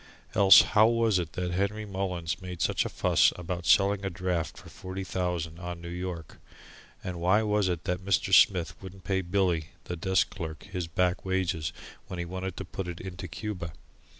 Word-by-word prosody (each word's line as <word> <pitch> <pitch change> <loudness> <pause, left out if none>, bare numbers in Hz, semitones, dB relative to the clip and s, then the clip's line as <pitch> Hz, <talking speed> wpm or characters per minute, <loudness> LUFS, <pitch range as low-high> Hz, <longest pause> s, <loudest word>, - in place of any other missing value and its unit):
Else 100 -1 +9
how 110 +1 +7
was 115 -4 +2
it 85 -2 -4
that 90 -1 -2
Henry 100 +4 -1
Mullins 95 -3 -3
made 90 -2 -7
such - - +1
a - - -2
fuss - - +3
about 90 -1 -5
selling 100 +3 +4
a 95 - -1
draft 85 -4 -2
for - - -12
forty 95 +1 -7
thousand 90 -3 -3
on 90 -1 -6
New 85 0 -8
York? 90 -3 -6 0.7
And 90 -1 -5
why 95 +5 +4
was 105 -2 +1
it 85 -2 -2
that 90 -1 -2
Mr. 100 0 +1
Smith 90 -4 +5
wouldn't 95 0 -10
pay 95 +1 0
Billy, 90 -3 0 0.2
the 90 - -5
desk 95 +1 +1
clerk, 80 -5 -6
his 90 -4 -4
back 90 +2 0
wages 95 -4 -1 0.4
when 90 - -6
he 85 - -3
wanted 95 +1 -5
to - - -5
put 95 -2 -5
it 85 -1 -6
into 90 -1 -7
Cuba? 90 -3 -5
90 Hz, 190 wpm, -28 LUFS, 85-95 Hz, 0.7 s, Else